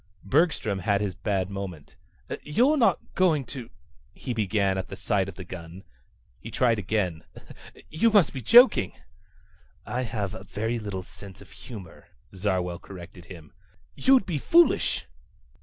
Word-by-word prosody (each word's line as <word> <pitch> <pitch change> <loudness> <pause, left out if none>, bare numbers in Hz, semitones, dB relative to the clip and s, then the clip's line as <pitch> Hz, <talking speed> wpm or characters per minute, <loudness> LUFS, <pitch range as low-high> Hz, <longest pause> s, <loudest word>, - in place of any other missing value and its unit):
Bergstrom 125 - +1
had 100 +2 +1
his 100 -2 -2
bad 95 0 -2
moment. 95 -6 -7 0.5
"You're 245 - +2
not 255 -6 +4 0.2
going 160 -7 +2
to 120 -1 -8 0.2
..." 65 - -33
he 125 - -4
began 100 -3 +1
at 95 - -5
the - - -7
sight 100 -2 0
of 90 - -10
the 95 - -8
gun. 90 +1 -9 0.6
He - - -9
tried 115 -3 +2
again. 90 -5 -1 0.7
"You 170 +9 +3
must 205 -8 +4
be 130 - -5
joking." 230 - +6 0.9
"I 125 - -2
have 105 -5 -3 0.2
very 115 +3 -2
little 100 -4 -5
sense 95 +1 -12
of 100 - -16
humor," 105 -10 -11 0.3
Zarwell 90 -3 -1
corrected 90 -1 -11
him. 85 -4 -12 0.4
"You'd 265 -5 +4
be 165 -6 -2
foolish!" 340 - +3
100 Hz, 145 wpm, -26 LUFS, 95-135 Hz, 0.9 s, joking